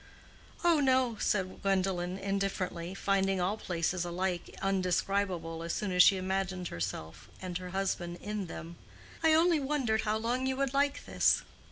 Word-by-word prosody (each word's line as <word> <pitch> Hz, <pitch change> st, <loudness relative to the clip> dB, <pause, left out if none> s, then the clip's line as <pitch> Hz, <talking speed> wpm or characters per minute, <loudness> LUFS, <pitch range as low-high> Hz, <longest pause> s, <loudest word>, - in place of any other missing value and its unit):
"Oh, 340 Hz, -3 st, +5 dB
no," 260 Hz, -4 st, +3 dB
said 185 Hz, -2 st, 0 dB
Gwendolen, 190 Hz, -2 st, 0 dB
indifferently, 195 Hz, -3 st, -2 dB
finding 195 Hz, -1 st, +1 dB
all 185 Hz, +4 st, +1 dB
places 175 Hz, -3 st, -1 dB
alike 175 Hz, 0 st, -2 dB
indescribable 185 Hz, -3 st, 0 dB
as 170 Hz, 0 st, -3 dB
soon 205 Hz, -3 st, -2 dB
as 180 Hz, 0 st, +5 dB
she 195 Hz, +1 st, +7 dB
imagined 185 Hz, -1 st, -2 dB
herself 80 Hz, -2 st, -5 dB
and 185 Hz, -2 st, -6 dB
her 180 Hz, 0 st, -7 dB
husband 180 Hz, -2 st, -2 dB
in 210 Hz, -2 st, -4 dB
them. 165 Hz, +1 st, -8 dB, 0.4 s
"I 320 Hz, -1 st, +5 dB
only 330 Hz, 0 st, +4 dB
wondered 265 Hz, -6 st, 0 dB
how 215 Hz, 0 st, 0 dB
long 245 Hz, +4 st, -1 dB
you 265 Hz, -, 0 dB
would 275 Hz, -1 st, -1 dB
like 280 Hz, +1 st, +1 dB
this." -, -, +3 dB
195 Hz, 155 wpm, -31 LUFS, 180-220 Hz, 0.4 s, she